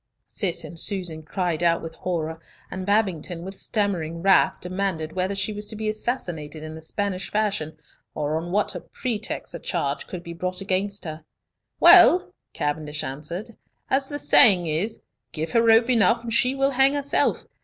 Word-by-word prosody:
Cis 190 Hz, -6 st, -2 dB
and 170 Hz, -, -6 dB
Susan 175 Hz, -5 st, -2 dB
cried 170 Hz, 0 st, -2 dB
out 170 Hz, -1 st, +2 dB
with 165 Hz, 0 st, -6 dB
horror, 160 Hz, -2 st, -3 dB, 0.3 s
and 185 Hz, 0 st, -5 dB
Babington 185 Hz, -5 st, 0 dB
with 190 Hz, +1 st, -7 dB
stammering 175 Hz, -7 st, -2 dB
wrath 195 Hz, -1 st, +4 dB
demanded 180 Hz, -4 st, -3 dB
whether 185 Hz, +2 st, -1 dB
she 195 Hz, +2 st, -1 dB
was 210 Hz, 0 st, -4 dB
to 215 Hz, -, -6 dB
be 215 Hz, 0 st, -2 dB
assassinated 170 Hz, -, -4 dB
in 155 Hz, 0 st, -7 dB
the 160 Hz, -, -9 dB
Spanish 195 Hz, +3 st, -3 dB
fashion, 200 Hz, -7 st, -1 dB, 0.4 s
or 150 Hz, 0 st, -1 dB
on 165 Hz, +2 st, -3 dB
what 205 Hz, +2 st, 0 dB, 0.2 s
pretext 220 Hz, -4 st, -3 dB
a -, -, -6 dB
charge -, -, -2 dB
could 180 Hz, -2 st, -7 dB
be 170 Hz, -, -7 dB
brought 180 Hz, +2 st, -4 dB
against 195 Hz, +1 st, -2 dB
her. 155 Hz, -1 st, -7 dB, 0.6 s
"Well," 365 Hz, +1 st, +7 dB, 0.2 s
Cavendish 150 Hz, 0 st, -3 dB
answered, 155 Hz, -, -5 dB, 0.4 s
"as 270 Hz, 0 st, +1 dB
the 290 Hz, -, -3 dB
saying 195 Hz, -10 st, +6 dB
is, 170 Hz, +8 st, -2 dB, 0.3 s
give 160 Hz, 0 st, -3 dB
her 230 Hz, -, +4 dB
rope 230 Hz, 0 st, +5 dB
enough, 230 Hz, 0 st, +3 dB
and 230 Hz, -1 st, -4 dB
she 255 Hz, +3 st, +2 dB
will 275 Hz, 0 st, +2 dB
hang 270 Hz, +2 st, +3 dB
herself. 285 Hz, -1 st, 0 dB
185 Hz, 170 wpm, -24 LUFS, 165-215 Hz, 0.6 s, Well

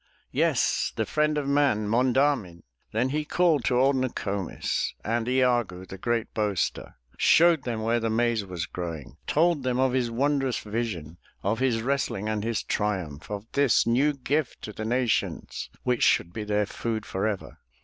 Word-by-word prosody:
Yes, -, -, +1 dB
the -, -, 0 dB
friend 150 Hz, 0 st, +1 dB
of 145 Hz, -2 st, -1 dB
man, 140 Hz, -7 st, +2 dB
Monda'min!*' 125 Hz, -6 st, +1 dB, 0.3 s
Then 120 Hz, +4 st, +1 dB
he 150 Hz, +3 st, -1 dB
called 160 Hz, -3 st, +2 dB
to 125 Hz, -, +2 dB
old 135 Hz, +2 st, +4 dB
Noko'mis 100 Hz, -7 st, -2 dB
And 115 Hz, +2 st, 0 dB
I -, -, +1 dB
a'goo, 115 Hz, -8 st, 0 dB
the 95 Hz, +1 st, -9 dB
great 120 Hz, +1 st, -1 dB
boaster, 105 Hz, -3 st, -1 dB, 0.2 s
Showed 170 Hz, -4 st, +5 dB
them 115 Hz, -3 st, -2 dB
where 115 Hz, +1 st, +2 dB
the 115 Hz, 0 st, -1 dB
maize 115 Hz, -1 st, +1 dB
was 90 Hz, -3 st, -4 dB
growing, 80 Hz, -5 st, -6 dB
Told 165 Hz, -1 st, +3 dB
them 125 Hz, -1 st, 0 dB
of 130 Hz, -1 st, +2 dB
his 125 Hz, -2 st, +1 dB
wondrous 135 Hz, +1 st, +1 dB
vision. 105 Hz, -8 st, -4 dB, 0.2 s
Of 110 Hz, +4 st, 0 dB
his 120 Hz, -4 st, +1 dB
wrestling 130 Hz, -6 st, -1 dB
and 105 Hz, -1 st, -1 dB
his 115 Hz, -2 st, -1 dB
triumph, 90 Hz, -8 st, -2 dB
Of 105 Hz, 0 st, -5 dB
this 140 Hz, -4 st, +3 dB
new 130 Hz, +6 st, +3 dB
gift 140 Hz, +1 st, -2 dB
to 105 Hz, -, -6 dB
the 110 Hz, -, -5 dB
nations. 120 Hz, 0 st, -1 dB
Which 125 Hz, -1 st, 0 dB
should 85 Hz, -, +3 dB
be 110 Hz, 0 st, -4 dB
their 105 Hz, 0 st, +1 dB
food 110 Hz, +1 st, -3 dB
forever. 100 Hz, +1 st, -3 dB
115 Hz, 170 wpm, -26 LUFS, 105-130 Hz, 0.3 s, Showed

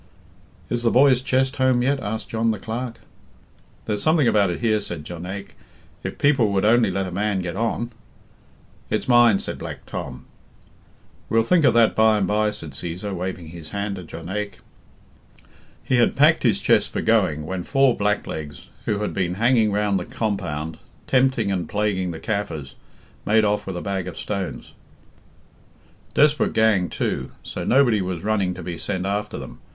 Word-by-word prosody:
"Is 120 Hz, +1 st, -2 dB
the 120 Hz, -, +3 dB
boy's 130 Hz, 0 st, +5 dB
chest 130 Hz, 0 st, +1 dB
home 130 Hz, -2 st, +3 dB
yet?" 140 Hz, +2 st, +1 dB
asked 110 Hz, -1 st, -4 dB
John 115 Hz, 0 st, 0 dB
the 110 Hz, -, 0 dB
Clerk. 115 Hz, +2 st, -5 dB, 0.8 s
"There's 105 Hz, -1 st, -1 dB
something 155 Hz, -4 st, +3 dB
about 100 Hz, -4 st, +3 dB
it 85 Hz, -, -3 dB
here," 110 Hz, -3 st, +2 dB
said 85 Hz, -6 st, -5 dB
Jonaique, 90 Hz, +4 st, -7 dB, 0.5 s
"if -, -, -5 dB
people 135 Hz, -7 st, +3 dB
would 100 Hz, 0 st, +1 dB
only 120 Hz, +2 st, +4 dB
let 95 Hz, 0 st, -1 dB
a 90 Hz, -, -6 dB
man 100 Hz, +1 st, 0 dB
get 90 Hz, 0 st, -4 dB
on." 115 Hz, +2 st, -1 dB, 1.0 s
"It's -, -, -1 dB
mine," 120 Hz, -4 st, +6 dB
said -, -, -4 dB
Black -, -, -7 dB
Tom. -, -, -6 dB, 1.0 s
"We'll 115 Hz, 0 st, +3 dB
think 165 Hz, +5 st, +3 dB
of -, -, +4 dB
that 115 Hz, -2 st, +4 dB
by 110 Hz, 0 st, +4 dB
and 100 Hz, -, +1 dB
bye," 105 Hz, +2 st, +1 dB
said 105 Hz, -7 st, -6 dB
Cæsar, 90 Hz, +8 st, -4 dB
waving 90 Hz, -2 st, -5 dB
his 80 Hz, -1 st, -9 dB
hand 100 Hz, +1 st, -3 dB
to 90 Hz, -, -7 dB
Jonaique. 95 Hz, +6 st, -5 dB, 1.3 s
"'He 130 Hz, -, +1 dB
had 120 Hz, -, +3 dB
packed -, -, +5 dB
his -, -, +2 dB
chest -, -, +3 dB
for -, -, -3 dB
going, 75 Hz, 0 st, +2 dB
when 95 Hz, +2 st, -3 dB
four 135 Hz, +5 st, +3 dB
blacklegs, 80 Hz, -7 st, -3 dB, 0.2 s
who 105 Hz, -1 st, -1 dB
had 105 Hz, -, -2 dB
been 90 Hz, -2 st, -1 dB
hanging 115 Hz, 0 st, +3 dB
round 100 Hz, -1 st, +1 dB
the 90 Hz, -, -5 dB
compound, 85 Hz, -8 st, -3 dB, 0.3 s
tempting 130 Hz, -5 st, +2 dB
and 90 Hz, -4 st, -2 dB
plaguing 100 Hz, -3 st, 0 dB
the 85 Hz, -, -5 dB
Kaffirs, 80 Hz, -8 st, -4 dB, 0.5 s
made 110 Hz, +1 st, +3 dB
off 105 Hz, -1 st, 0 dB
with 95 Hz, -2 st, -4 dB
a -, -, -4 dB
bag 95 Hz, -3 st, -3 dB
of 90 Hz, -, -7 dB
stones. 100 Hz, -3 st, -5 dB, 1.4 s
Desperate 150 Hz, 0 st, +3 dB
gang, 105 Hz, -6 st, +3 dB
too; -, -, -3 dB
so -, -, -5 dB
nobody 120 Hz, -6 st, +4 dB
was 90 Hz, -2 st, -4 dB
running 100 Hz, -4 st, 0 dB
to 90 Hz, -, -8 dB
be 85 Hz, -1 st, -5 dB
sent 95 Hz, -2 st, -3 dB
after 100 Hz, +1 st, -2 dB
them. -, -, -9 dB
105 Hz, 175 wpm, -23 LUFS, 90-115 Hz, 1.4 s, mine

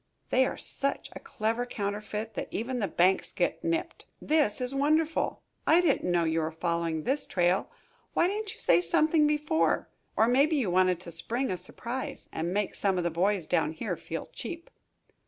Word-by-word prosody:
They 260 Hz, 0 st, +4 dB
are -, -, -5 dB
such 275 Hz, 0 st, -2 dB
a -, -, -6 dB
clever 225 Hz, +2 st, -2 dB
counterfeit 210 Hz, 0 st, -4 dB
that -, -, -4 dB
even 245 Hz, +3 st, -3 dB
the 205 Hz, -, 0 dB
banks 185 Hz, +2 st, +2 dB
get -, -, -1 dB
nipped. 335 Hz, +1 st, -2 dB
This 300 Hz, -9 st, +2 dB
is 250 Hz, +1 st, 0 dB
wonderful! 310 Hz, +3 st, +1 dB, 0.2 s
I 330 Hz, -, +6 dB
didn't 345 Hz, -, +2 dB
know 175 Hz, -1 st, +3 dB
you 160 Hz, 0 st, +1 dB
were 160 Hz, 0 st, -1 dB
following 165 Hz, -1 st, -2 dB
this 275 Hz, +3 st, 0 dB
trail. 180 Hz, +1 st, +1 dB, 0.5 s
Why 340 Hz, -, +4 dB
didn't 415 Hz, +1 st, -3 dB
you -, -, -15 dB
say 170 Hz, -, +4 dB
something 305 Hz, -, +4 dB
before? 300 Hz, +1 st, +1 dB, 0.3 s
Or 220 Hz, -, +5 dB
maybe 280 Hz, +6 st, +3 dB
you 240 Hz, -11 st, 0 dB
wanted 185 Hz, -1 st, +3 dB
to 175 Hz, -, -7 dB
spring 230 Hz, +9 st, -1 dB
a -, -, 0 dB
surprise, 240 Hz, +7 st, -5 dB
and 170 Hz, +2 st, -2 dB
make 205 Hz, +1 st, -1 dB
some 195 Hz, -2 st, 0 dB
of 180 Hz, -, 0 dB
the 170 Hz, -, 0 dB
boys, 185 Hz, +1 st, +1 dB
down 155 Hz, +1 st, +1 dB
here 160 Hz, -, -3 dB
feel -, -, -6 dB
cheap." 335 Hz, -1 st, -7 dB
215 Hz, 185 wpm, -29 LUFS, 175-295 Hz, 0.5 s, I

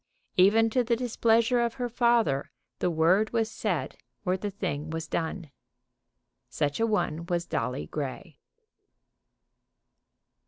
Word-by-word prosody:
Even 220 Hz, +5 st, +5 dB
to 250 Hz, +2 st, +2 dB
the 235 Hz, 0 st, +1 dB
displeasure 235 Hz, 0 st, +2 dB
of 235 Hz, -1 st, -1 dB
her 245 Hz, -1 st, -2 dB
father 235 Hz, -, +2 dB, 0.3 s
the -, -, +1 dB
word 175 Hz, +6 st, +3 dB
was 225 Hz, -1 st, +1 dB
said 180 Hz, -11 st, -2 dB, 0.3 s
or 180 Hz, -, +2 dB
the 205 Hz, +2 st, -3 dB
thing 165 Hz, -6 st, -4 dB
was 160 Hz, 0 st, -4 dB
done. 165 Hz, -2 st, -3 dB, 1.0 s
Such 145 Hz, +4 st, -1 dB
a 225 Hz, -, +2 dB
one 170 Hz, -6 st, -1 dB
was 175 Hz, -1 st, -1 dB
Dolly 125 Hz, 0 st, -2 dB
Grey. 145 Hz, +2 st, -6 dB
190 Hz, 125 wpm, -28 LUFS, 160-225 Hz, 1.0 s, Even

